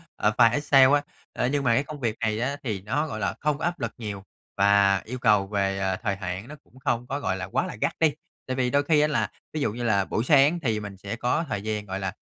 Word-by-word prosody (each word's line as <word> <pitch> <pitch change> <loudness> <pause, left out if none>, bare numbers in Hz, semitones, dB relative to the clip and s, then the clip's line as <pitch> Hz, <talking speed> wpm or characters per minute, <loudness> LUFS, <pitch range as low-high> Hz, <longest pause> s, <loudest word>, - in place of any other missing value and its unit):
ờ, - - +1
file 115 +1 +6
Excel 140 0 +5
á. 145 - +4 0.3
Ơ, - - -1
nhưng 140 +2 0
mà 115 -3 +3
cái 135 - +2
công 150 0 -9
việc 115 -3 -1
này 110 -1 0
á, 140 +4 -1
thì 105 -7 -3
nó, 135 +10 -1
gọi 110 -8 -5
là, 90 -3 -1
không 150 0 0
có 160 - -3
áp 175 0 -2
lực 115 -2 -2
nhiều 105 -4 -6 0.3
và 100 0 +4
yêu 125 +3 -6
cầu 105 -5 +3
về, 100 -1 0
ờ, 95 -1 0
thời 100 -3 0
hạn 95 +2 -5
nó 150 - -9
cũng 130 - -20
không 120 -1 -1
có, 140 +2 -3
gọi 95 - -1
là, 95 - -4
quá - - -1
là - - -6
gắt - - +1
đi, 160 -3 +3 0.3
tại 130 - -2
vì 125 -1 +1
đôi 140 +2 +2
khi 150 0 +3
á 150 - +4
là 150 - 0 0.2
ví 155 - -2
dụ 110 - +1
như 120 +1 -5
là 100 -4 +2
buổi 110 - -1
sáng 145 +4 +4
thì 115 -8 -1
mình 105 -2 -8
sẽ 100 +3 -5
có 125 +8 0
thời 105 -6 -2
gian, 105 -1 -3
gọi 95 -1 -4
là, 95 -1 -3
115 Hz, 285 wpm, -25 LUFS, 100-140 Hz, 0.3 s, file